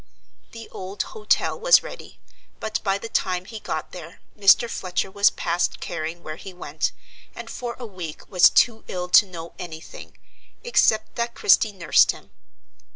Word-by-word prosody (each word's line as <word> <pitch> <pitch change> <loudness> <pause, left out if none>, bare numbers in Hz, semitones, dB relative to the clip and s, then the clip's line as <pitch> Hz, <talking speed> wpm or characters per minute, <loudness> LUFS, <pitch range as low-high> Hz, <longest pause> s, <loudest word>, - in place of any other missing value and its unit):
The 230 -1 -10
old 190 +2 -5
hotel 210 - -1
was - - +6
ready; - - -11 0.4
but 220 0 -3
by 195 -1 +1
the 215 - -7
time 185 -4 -1
he 220 +2 -8
got - - -5
there - - -10 0.2
Mr. 205 +3 +5
Fletcher 190 -3 -3
was 200 +1 +4
past 175 +1 -1
caring 165 +1 -5
where 155 0 -7
he 190 +1 -10
went, 180 - -3 0.4
and - - -8
for 240 -1 -5
a 250 - -7
week 180 -7 -8
was 185 -2 +6
too 225 -2 +2
ill 180 -1 -4
to 205 - +6
know 170 -2 -9
any 160 -2 -7
thing, - - -13 0.5
except 220 - +2
that 235 0 -2
Christie 215 +2 +4
nursed 180 -5 +3
him. - - -16
195 Hz, 165 wpm, -23 LUFS, 175-220 Hz, 0.5 s, was